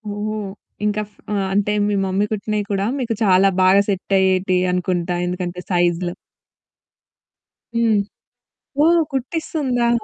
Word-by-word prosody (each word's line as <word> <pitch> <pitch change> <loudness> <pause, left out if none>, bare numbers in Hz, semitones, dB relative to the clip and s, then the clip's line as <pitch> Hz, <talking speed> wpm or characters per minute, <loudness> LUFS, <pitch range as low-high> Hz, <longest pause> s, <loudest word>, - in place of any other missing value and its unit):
ఓహో! 215 +1 -3 0.5
ఇంక 210 0 0
ఫ్ - - -32 0.2
ఆహ్, 195 -2 0
అంటే 205 +1 +1
మీ 205 - 0
మమ్మీ 190 +2 +1
కుట్టినవి 210 0 -2
కూడా 195 0 0
మీకు 235 -3 -1
చాలా 195 -1 +5
బాగా 190 +2 +6
సెట్ 195 0 0
అయ్యేటియి 185 -1 +2
అనుకుంటా 180 -1 -1
ఎందుకంటే 180 0 -4
సైజు‌లు. 175 0 +1 1.6
హ్మ్. 230 -2 +3 0.9
ఓహ్! 340 +1 +5
కుట్టిస్తుందా? 265 -3 -1
195 Hz, 120 wpm, -20 LUFS, 185-215 Hz, 1.6 s, బాగా